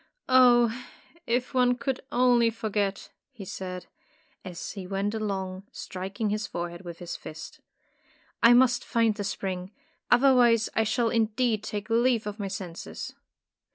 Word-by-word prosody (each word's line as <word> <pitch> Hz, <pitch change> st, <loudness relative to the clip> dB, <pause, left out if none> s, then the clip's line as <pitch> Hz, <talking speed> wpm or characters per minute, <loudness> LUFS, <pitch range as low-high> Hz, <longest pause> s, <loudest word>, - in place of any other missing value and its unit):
''Oh, 240 Hz, -3 st, +5 dB, 0.5 s
if 245 Hz, +2 st, 0 dB
one 250 Hz, -1 st, +3 dB
could 260 Hz, +1 st, -2 dB
only 245 Hz, -2 st, +4 dB
forget!" 205 Hz, -3 st, -2 dB, 0.2 s
he 195 Hz, -, -10 dB
said, 185 Hz, -1 st, -6 dB, 0.6 s
as 180 Hz, -3 st, -6 dB
he 195 Hz, -4 st, -7 dB
went 200 Hz, +2 st, -1 dB
along, 195 Hz, -3 st, -4 dB
striking 195 Hz, +4 st, -4 dB
his 215 Hz, +1 st, -2 dB
fore 175 Hz, 0 st, -4 dB
head 175 Hz, -, -10 dB
with 170 Hz, -2 st, -8 dB
his 175 Hz, -1 st, -6 dB
fist. 155 Hz, -, -9 dB, 0.8 s
"I 230 Hz, +1 st, +8 dB
must 245 Hz, 0 st, +4 dB
find 230 Hz, -2 st, +2 dB
the 205 Hz, 0 st, -5 dB
spring. 185 Hz, -2 st, -4 dB, 0.4 s
Otherwise 245 Hz, -3 st, +5 dB
I 220 Hz, -, +2 dB
shall 230 Hz, +2 st, +1 dB
indeed 225 Hz, 0 st, +1 dB
take 210 Hz, 0 st, -5 dB
leave 235 Hz, -1 st, +2 dB
of 210 Hz, +1 st, -5 dB
my 200 Hz, -, -2 dB
senses." 185 Hz, -3 st, -7 dB
215 Hz, 145 wpm, -27 LUFS, 190-240 Hz, 0.8 s, I